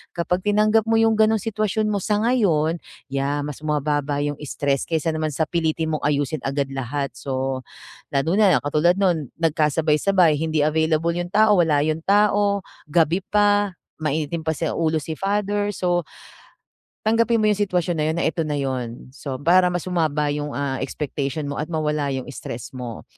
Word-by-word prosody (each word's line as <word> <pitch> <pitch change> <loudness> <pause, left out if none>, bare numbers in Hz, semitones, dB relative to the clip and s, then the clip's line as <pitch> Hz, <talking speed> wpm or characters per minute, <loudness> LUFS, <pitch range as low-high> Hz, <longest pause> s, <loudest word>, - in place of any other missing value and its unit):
Kapag 180 +1 -1
tinanggap 215 +2 +2
mo 225 - +4
yung 225 0 +4
gano'ng 220 0 +3
sitwasyon 215 0 -1
mo 200 - 0
sa 210 +2 +1
ngayon, 170 -10 +2 0.3
yeah, 140 +1 -1
mas 150 -2 -6
bumababa 145 -1 -1
yung 145 -1 -3
stress 140 -1 -1
kaysa 160 -1 0
naman 155 0 -1
sa 155 +2 -1
pilitin 160 -1 -1
mong 155 - -2
ayusin 145 0 -1
agad 140 +1 -1
lahat. 135 0 -3
So, 130 0 -3 0.5
lalo 140 +4 0
na, 200 -4 +5
na - - 0
katulad 155 +5 +2
no'n, 170 -9 +1
nagkasabay-sabay, 160 +2 +2
hindi 160 -1 0
available 160 +1 +1
yung 175 +1 -3
tao, 210 -1 +4
wala 150 -3 +2
yung 155 +1 -1
tao, 205 +1 +2 0.3
gabi 165 +3 +2
pa, 205 -1 +2 0.3
mainitin 155 +2 -1
pa 160 -1 -2
sa 160 +2 -1
ulo 160 -1 +1
si 160 +2 -5
father, 205 +3 -1
so 180 -2 0 1.0
tanggapin 230 +1 +3
mo 215 - +1
yung 205 - -3
sitwasyon 175 -2 0
na - - +1
yun 160 - -1
na 170 - 0
eto 165 - 0
na 150 - -1
'yon. 130 -3 -4
So, 135 -1 -6
para 180 +6 +4
mas 175 -1 -3
bumaba 155 -5 0
yung, 145 0 -4
ah, 140 -2 -2
expectation 145 0 -3
mo 145 0 -4
at 155 - -4
mawala 150 -3 -1
yung 130 -2 -3
stress 120 -2 -7
mo. 125 -3 -7
160 Hz, 175 wpm, -22 LUFS, 145-190 Hz, 1.0 s, na